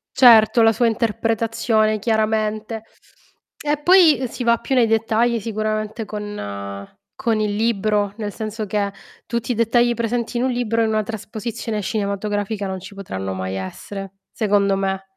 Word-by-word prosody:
Certo, 235 Hz, -2 st, +7 dB
la 225 Hz, 0 st, +6 dB
sua 240 Hz, +2 st, +1 dB
interpretazione 225 Hz, -1 st, +1 dB
chiaramente. 220 Hz, 0 st, -1 dB, 0.8 s
E 295 Hz, 0 st, -1 dB
poi 330 Hz, -5 st, +6 dB
si 245 Hz, -, -6 dB
va 235 Hz, 0 st, +4 dB
più 265 Hz, -, -2 dB
nei 240 Hz, -3 st, +4 dB
dettagli 225 Hz, +1 st, +2 dB
sicuramente 215 Hz, 0 st, -3 dB
con 100 Hz, -, -6 dB, 0.3 s
con 225 Hz, -2 st, 0 dB
il 210 Hz, -1 st, 0 dB
libro, 210 Hz, -2 st, +1 dB
nel 210 Hz, -2 st, -4 dB
senso 215 Hz, -1 st, -4 dB
che 200 Hz, 0 st, -1 dB, 0.4 s
tutti 235 Hz, +1 st, -2 dB
i -, -, -5 dB
dettagli 235 Hz, +1 st, +3 dB
presenti 235 Hz, +1 st, -2 dB
in 245 Hz, -, 0 dB
un 260 Hz, -, +1 dB
libro 230 Hz, -2 st, 0 dB
in 220 Hz, -, +1 dB
una 215 Hz, -1 st, +1 dB
trasposizione 220 Hz, +1 st, -5 dB
cinematografica 205 Hz, 0 st, -2 dB
non 190 Hz, 0 st, -4 dB
ci 195 Hz, +2 st, -11 dB
potranno 95 Hz, -, -5 dB
mai 95 Hz, 0 st, -4 dB
essere, 195 Hz, -, -7 dB, 0.2 s
secondo 200 Hz, -2 st, +2 dB
me. 195 Hz, 0 st, -2 dB
215 Hz, 150 wpm, -21 LUFS, 205-230 Hz, 0.8 s, Certo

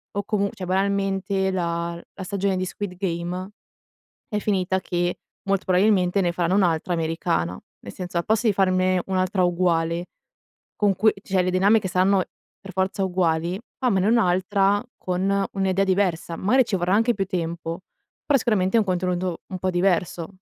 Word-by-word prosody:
o 205 Hz, -, -1 dB
comu 200 Hz, -1 st, 0 dB
cioè 185 Hz, -, -6 dB
banalmente, 195 Hz, 0 st, 0 dB
la 170 Hz, -1 st, -2 dB
la 190 Hz, -, -7 dB
stagione 195 Hz, 0 st, -1 dB
di 185 Hz, -, -1 dB
Squid 185 Hz, 0 st, -5 dB
Game, 180 Hz, +1 st, -3 dB, 0.8 s
è 210 Hz, -, -1 dB
finita 190 Hz, -2 st, 0 dB
che, 175 Hz, 0 st, -2 dB, 0.3 s
molto 195 Hz, -1 st, +1 dB
probabilmente, 190 Hz, 0 st, +3 dB
ne 175 Hz, -, +1 dB
faranno 175 Hz, +1 st, 0 dB
un'altra 175 Hz, -2 st, +1 dB
americana, 95 Hz, -, -1 dB, 0.2 s
nel 100 Hz, -, -9 dB
senso, 180 Hz, -1 st, -7 dB
al 170 Hz, -, -2 dB
posto 220 Hz, +1 st, +1 dB
di 215 Hz, -, +4 dB
farne 185 Hz, -1 st, +2 dB
un'altra 185 Hz, 0 st, 0 dB
uguale, 170 Hz, -1 st, +1 dB, 0.7 s
con 205 Hz, -2 st, +2 dB
cui 215 Hz, +3 st, +4 dB
cioè 190 Hz, -1 st, +1 dB
le 185 Hz, -, 0 dB
dinamiche 195 Hz, +2 st, +3 dB
saranno 185 Hz, +1 st, +2 dB, 0.4 s
per 195 Hz, -, -10 dB
forza 190 Hz, +1 st, 0 dB
uguali, 175 Hz, 0 st, 0 dB, 0.2 s
fammene 200 Hz, -8 st, +2 dB
un'altra 200 Hz, -1 st, +2 dB
con 195 Hz, +2 st, 0 dB
un'idea 195 Hz, 0 st, +1 dB
diversa. 180 Hz, -3 st, 0 dB
Magari 235 Hz, +10 st, +3 dB
ci 210 Hz, -, -1 dB
vorrà 180 Hz, 0 st, 0 dB
anche 230 Hz, +2 st, +3 dB
più 195 Hz, -1 st, -1 dB
tempo, 170 Hz, -1 st, -4 dB, 0.4 s
però 285 Hz, -2 st, +4 dB
sicuramente, 210 Hz, -3 st, +1 dB
è -, -, +6 dB
un 215 Hz, -, +1 dB
contenuto 180 Hz, -1 st, -1 dB
un 185 Hz, -, -4 dB
po' 185 Hz, 0 st, 0 dB
diverso. 175 Hz, -2 st, 0 dB
185 Hz, 160 wpm, -24 LUFS, 175-195 Hz, 0.8 s, è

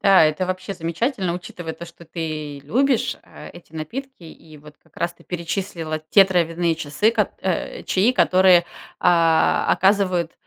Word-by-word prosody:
Да, 195 Hz, -5 st, +6 dB
это 155 Hz, +4 st, 0 dB
вообще 185 Hz, +1 st, -4 dB
замечательно, 180 Hz, -, -2 dB
учитывая 175 Hz, -2 st, -7 dB
то, 170 Hz, -, -9 dB
что 170 Hz, 0 st, -15 dB
ты 155 Hz, -3 st, -5 dB
любишь, 250 Hz, -, +1 dB
а, -, -, -12 dB
эти 170 Hz, -2 st, -16 dB
напитки, 250 Hz, -, -7 dB
и 160 Hz, -1 st, -14 dB
вот 150 Hz, 0 st, -15 dB
как 160 Hz, -, -30 dB
раз 170 Hz, 0 st, -2 dB
ты -, -, -22 dB
перечислила 170 Hz, -2 st, -4 dB
те 195 Hz, -2 st, +7 dB
травяные 170 Hz, -2 st, 0 dB
часы, 160 Hz, +8 st, 0 dB
кот 210 Hz, -4 st, 0 dB
э, 185 Hz, -2 st, -3 dB
чаи, 210 Hz, +7 st, +2 dB
которые, 185 Hz, -6 st, +5 dB, 0.4 s
а, 165 Hz, -2 st, +3 dB
оказывают 185 Hz, -4 st, +2 dB
175 Hz, 155 wpm, -21 LUFS, 160-190 Hz, 0.4 s, те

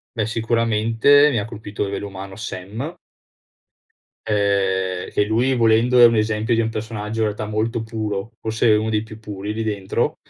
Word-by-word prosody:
Beh, 110 Hz, -3 st, 0 dB
sicuramente 115 Hz, +5 st, +3 dB
mi 125 Hz, -, 0 dB
ha 100 Hz, -, -1 dB
colpito 110 Hz, -2 st, -6 dB
a -, -, 0 dB
livello 100 Hz, +1 st, -4 dB
umano 95 Hz, 0 st, -8 dB
Sam 110 Hz, -, -6 dB, 1.3 s
ehm, 95 Hz, -3 st, 0 dB
che 105 Hz, -, +1 dB
lui 120 Hz, +5 st, +1 dB
volendo 115 Hz, +2 st, +3 dB
è 120 Hz, -, +9 dB
un 115 Hz, -1 st, +6 dB
esempio 110 Hz, +2 st, +1 dB
di 115 Hz, -, +2 dB
un 115 Hz, -, 0 dB
personaggio 110 Hz, 0 st, -4 dB
in -, -, +3 dB
realtà 105 Hz, 0 st, -3 dB
molto 110 Hz, +2 st, -1 dB
puro, 110 Hz, -1 st, -4 dB
forse 110 Hz, +1 st, 0 dB
uno 110 Hz, +1 st, +2 dB
dei 105 Hz, -1 st, +1 dB
più 110 Hz, 0 st, -11 dB
puri 105 Hz, -1 st, -6 dB
lì 115 Hz, -, -2 dB
dentro 100 Hz, -3 st, -1 dB
110 Hz, 175 wpm, -21 LUFS, 105-115 Hz, 1.3 s, è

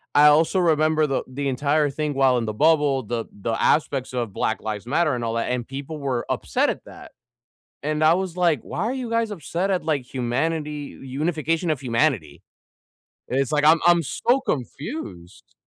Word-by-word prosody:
I 150 Hz, +1 st, +8 dB
also 160 Hz, +5 st, +4 dB
remember 155 Hz, -2 st, +3 dB
the 135 Hz, -, -1 dB
the 140 Hz, +2 st, -4 dB
entire 145 Hz, +3 st, +1 dB
thing 150 Hz, +1 st, -2 dB
while 135 Hz, -2 st, +3 dB
in 115 Hz, -, -1 dB
the 110 Hz, -, -3 dB
bubble, 145 Hz, -1 st, +3 dB
the 115 Hz, +1 st, -3 dB
the 115 Hz, +3 st, -4 dB
aspects 135 Hz, -4 st, +1 dB
of 120 Hz, -5 st, -3 dB
Black 110 Hz, -, -1 dB
Lives 105 Hz, -1 st, -4 dB
Matter 150 Hz, -1 st, +1 dB
and 120 Hz, -, -4 dB
all 115 Hz, -, -2 dB
that, 115 Hz, +2 st, -1 dB
and 125 Hz, -2 st, -2 dB
people 140 Hz, +3 st, -6 dB
were 130 Hz, -4 st, -2 dB
upset -, -, 0 dB
at -, -, -4 dB
that, -, -, -12 dB, 0.7 s
and 155 Hz, +1 st, 0 dB
I 155 Hz, -, +6 dB
was, 185 Hz, -2 st, -3 dB
like, 170 Hz, -8 st, +2 dB
"Why -, -, -7 dB
are 245 Hz, -, -1 dB
you 255 Hz, -3 st, -4 dB
guys 230 Hz, -2 st, 0 dB
upset 180 Hz, +2 st, -2 dB
at 185 Hz, -2 st, 0 dB
like 150 Hz, -5 st, 0 dB
humanity, 145 Hz, +4 st, -3 dB
unification 155 Hz, +4 st, -1 dB
of 150 Hz, -, -2 dB
humanity?" 115 Hz, -, 0 dB, 0.9 s
It's 135 Hz, +1 st, 0 dB
like 150 Hz, -1 st, +1 dB
I'm 160 Hz, +1 st, +6 dB
I'm 175 Hz, -1 st, +5 dB
so 245 Hz, -, +1 dB
confused. 125 Hz, -, -5 dB
145 Hz, 185 wpm, -23 LUFS, 125-160 Hz, 0.9 s, I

